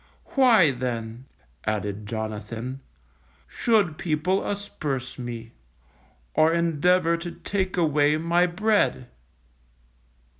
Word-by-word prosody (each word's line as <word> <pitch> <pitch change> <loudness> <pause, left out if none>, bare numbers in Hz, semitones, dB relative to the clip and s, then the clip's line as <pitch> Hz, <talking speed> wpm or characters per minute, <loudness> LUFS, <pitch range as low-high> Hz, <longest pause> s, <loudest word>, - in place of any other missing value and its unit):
Why, 230 - +6
then_, 120 -1 -4 0.4
added 105 -1 -3
Jonathan, 110 +3 -5 0.7
_should 200 - +1
people 175 +3 0
asperse 145 -12 -4
me, 115 -2 -6 0.8
or 155 +1 +4
endeavour 170 +1 +2
to 170 +1 -6
take 185 +2 -3
away 150 -2 +3
my 170 +2 +2
bread? 195 - +1
155 Hz, 85 wpm, -25 LUFS, 120-180 Hz, 0.8 s, Why